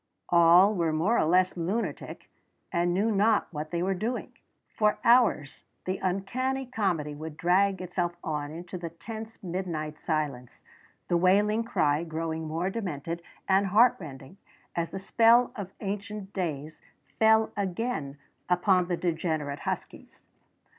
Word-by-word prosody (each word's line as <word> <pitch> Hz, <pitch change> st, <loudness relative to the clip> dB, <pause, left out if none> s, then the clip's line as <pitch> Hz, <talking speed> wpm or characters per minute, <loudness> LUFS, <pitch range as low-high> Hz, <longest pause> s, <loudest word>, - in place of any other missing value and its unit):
All 175 Hz, +4 st, +6 dB
were 170 Hz, -5 st, 0 dB
more 170 Hz, +10 st, +2 dB
or -, -, +3 dB
less 180 Hz, +3 st, +3 dB
lunatic, 185 Hz, +7 st, -3 dB, 0.4 s
and 175 Hz, +1 st, +1 dB
knew 205 Hz, +5 st, +1 dB
not 210 Hz, +1 st, +3 dB
what 155 Hz, +1 st, -5 dB
they 170 Hz, +1 st, -1 dB
were 195 Hz, +1 st, +1 dB
doing. 225 Hz, +7 st, -3 dB, 0.4 s
For 210 Hz, -1 st, +2 dB
hours 230 Hz, -, +3 dB, 0.2 s
the 185 Hz, +1 st, -2 dB
uncanny 250 Hz, +9 st, -1 dB
comedy 185 Hz, -, -1 dB
would 155 Hz, +1 st, -8 dB
drag 190 Hz, +2 st, +2 dB
itself 175 Hz, -1 st, -2 dB
on 150 Hz, -3 st, -3 dB
into 170 Hz, +3 st, -7 dB
the 170 Hz, -1 st, -5 dB
tense 220 Hz, +6 st, -9 dB
midnight 170 Hz, -4 st, -4 dB
silence, 145 Hz, -6 st, -3 dB, 0.4 s
the 175 Hz, -, +2 dB
wailing 205 Hz, +5 st, +3 dB
cry 150 Hz, -8 st, +1 dB
growing 160 Hz, -1 st, -4 dB
more 165 Hz, +5 st, -2 dB
demented 170 Hz, -6 st, -4 dB, 0.3 s
and 195 Hz, +1 st, +3 dB
heartrending 185 Hz, -, +1 dB, 0.4 s
as 170 Hz, -1 st, -1 dB
the -, -, -6 dB
spell 230 Hz, +5 st, +4 dB
of 195 Hz, -3 st, -6 dB
ancient 205 Hz, 0 st, -5 dB
days 155 Hz, -4 st, -4 dB, 0.4 s
fell 220 Hz, 0 st, +4 dB
again 190 Hz, -, -3 dB, 0.3 s
upon 180 Hz, 0 st, +3 dB
the 175 Hz, -1 st, -1 dB
degenerate 160 Hz, -4 st, -2 dB
huskies. -, -, -7 dB
180 Hz, 135 wpm, -28 LUFS, 160-205 Hz, 0.4 s, All